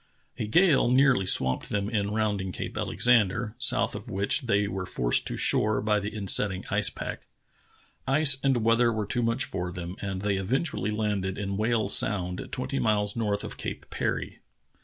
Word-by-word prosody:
A 110 - -2
gale 155 - +4
nearly 130 -6 +3
swamped 65 -7 +2
them 100 -1 -1
in 105 -2 -1
rounding 105 -3 -1
Cape - - -6
Alexander, 115 -2 +1
south 130 0 +2
of 120 - -8
which 100 -1 +1
they 100 -2 +2
were 95 -2 -5
forced - - +1
to - - -4
shore 105 0 +2
by 105 0 +1
the 105 +1 -5
insetting 100 -2 +3
ice 105 0 +2
pack. - - -7 0.8
Ice 140 0 +3
and 130 -5 +1
weather 115 +1 +3
were 110 -2 -2
too 120 - -2
much 115 +3 0
for 90 -2 -4
them, 90 0 -7
and 95 -1 -4
they 100 -2 0
eventually 110 - -1
landed 105 -3 -2
in 100 -1 -3
Whale 110 0 0
Sound, 90 -3 -1
twenty 135 +2 -3
miles 105 -2 +1
north 105 -3 -1
of - - -7
Cape - - -7
Parry. - - -3
105 Hz, 175 wpm, -27 LUFS, 95-115 Hz, 0.8 s, gale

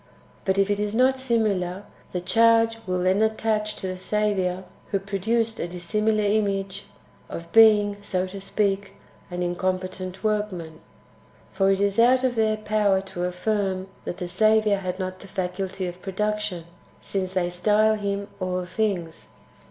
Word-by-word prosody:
But 190 -1 +1
if 195 +1 +3
it 205 - 0
is 210 +1 -1
not 260 +2 +3
similar, 205 -7 0 0.3
the 180 - -2
charge 225 +3 +4
will 180 -1 0
then 190 +3 +3
attach 220 -1 0
to 190 - -5
the 185 0 -4
Saviour, 190 -3 0 0.3
who 200 - +1
produced 220 +4 -1
a - - -2
dissimilar 210 +5 0
image, 200 -2 0 0.2
— - - -30
of 170 0 -7
being, 210 -2 +6
so 185 -2 -1
to 190 +1 -7
speak, 195 0 -1 0.3
an 180 0 -4
incom 185 +1 0
petent 185 +1 -7
workman. 195 -7 -2 0.7
For 195 -1 +2
it 195 0 +2
is 200 +1 +1
out 255 +2 +5
of 255 -1 +2
their 220 -2 +1
power 210 -2 +2
to 175 0 -2
affirm 190 +1 -1 0.2
that - - -4
the 180 -2 -4
Saviour 215 +2 +3
had 185 -1 -4
not 185 -1 -4
the 195 - -12
faculty 185 0 -3
of 180 0 -6
production, 210 -2 -2 0.4
since 190 -1 -3
they 175 -2 0
style 210 +4 +3
Him 200 -1 -2
All 185 -1 -2
Things. 180 -4 -2
195 Hz, 160 wpm, -25 LUFS, 185-215 Hz, 0.7 s, being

